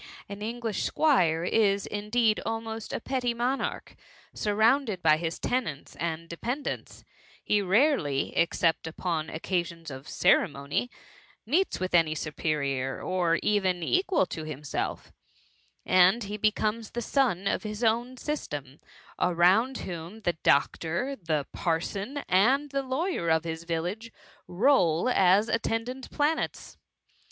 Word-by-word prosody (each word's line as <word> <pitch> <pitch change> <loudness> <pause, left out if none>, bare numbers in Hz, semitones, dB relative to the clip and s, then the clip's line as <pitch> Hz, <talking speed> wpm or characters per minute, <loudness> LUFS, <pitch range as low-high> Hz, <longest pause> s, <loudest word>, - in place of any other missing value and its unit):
An 200 0 -8
English 225 -1 -2
^Squire 175 - +2
is 200 -3 +2
indeed 215 +2 +1
almost 225 -1 -4
a - - -2
petty 245 -1 -1
mcmarch: 250 +3 -2 0.4
surrounded 220 -1 +1
by 155 -1 +5
his 165 0 -3
tenants 220 - -3
and 165 0 -3
de 170 - -8
pendants^ 255 - -4 0.4
he 210 -1 +2
rarely, 195 - +2
except 165 -1 +1
upon 160 -1 -3
occasions 170 -1 -3
of 130 +2 -9
ceremony, 140 - +1 0.6
meets 335 - +1
with 185 -1 -3
any 165 -2 +4
superior, 140 -4 -2
or 175 -3 +1
even 190 -4 +1
equal 370 - +2
to 160 -2 -6
himself; 150 -2 -4 0.7
and 185 +5 +5
he 205 +1 -5
becomes 215 +1 0
the 240 - -4
sun 230 -9 +1
of 195 - 0
his 215 +2 -5
own 235 +3 +1
system, 145 - -5 0.4
around 185 +9 +3
whom 175 +4 -7
the 175 -4 0
doctor, 165 - +1
the 155 - -2
parson, 195 - -2
and 265 +10 +3
the 275 -1 0
lawyer 265 - -1
of 160 0 +3
his 165 0 -5
village, 175 +8 -3 0.4
roll 180 - +3
as 195 -1 +4
attendant 230 +3 -2
planets. 300 +2 -1
200 Hz, 125 wpm, -28 LUFS, 165-235 Hz, 0.7 s, by